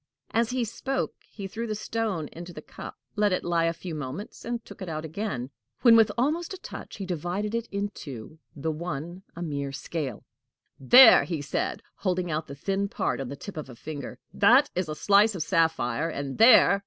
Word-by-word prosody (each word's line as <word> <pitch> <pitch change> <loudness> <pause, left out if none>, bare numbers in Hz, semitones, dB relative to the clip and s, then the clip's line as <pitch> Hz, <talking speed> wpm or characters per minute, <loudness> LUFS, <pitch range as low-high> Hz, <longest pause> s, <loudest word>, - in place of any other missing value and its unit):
As 230 +1 +2
he 250 -1 0
spoke, 265 +5 -2 0.2
he 200 - -8
threw 230 +4 -4
the 215 - -2
stone 215 -7 -2
into 175 +1 -9
the - - -8
cup, - - -9 0.2
let 210 -1 +3
it 185 - 0
lie 170 -1 +1
a 165 - +2
few 170 0 -7
moments, 150 +7 -6
and 235 0 -4
took - - -12
it 185 - -5
out 155 0 -4
again; 155 - -4 0.3
when, 230 -2 +8
almost 315 +9 0
with 380 - -8
a - - -45
touch, - - -8
he 195 - -4
divided 180 +4 -3
it 230 0 -2
in 200 +1 -1
two, 145 - -9 0.2
the 160 +2 -2
one 170 +2 -5
a 170 - -5
mere 140 -3 -3
scale. 135 -3 -4 0.6
"There!" 245 - +9
he 165 -4 -3
said, 140 -1 -2
holding 180 -3 -1
out 155 +1 -2
the 140 - -8
thin 195 +7 -1
part 195 - -1
on 130 - -5
the 140 - -5
tip 190 +5 -9
of 150 -3 -6
a 125 - -10
finger, 140 -1 -7 0.2
"that 265 +4 +5
is 180 -3 -2
a 155 - -3
slice 205 +4 +4
of 170 - -1
sapphire; 160 -5 +1
and 140 -1 -5
there!" 225 -3 +7
175 Hz, 205 wpm, -27 LUFS, 150-215 Hz, 0.6 s, There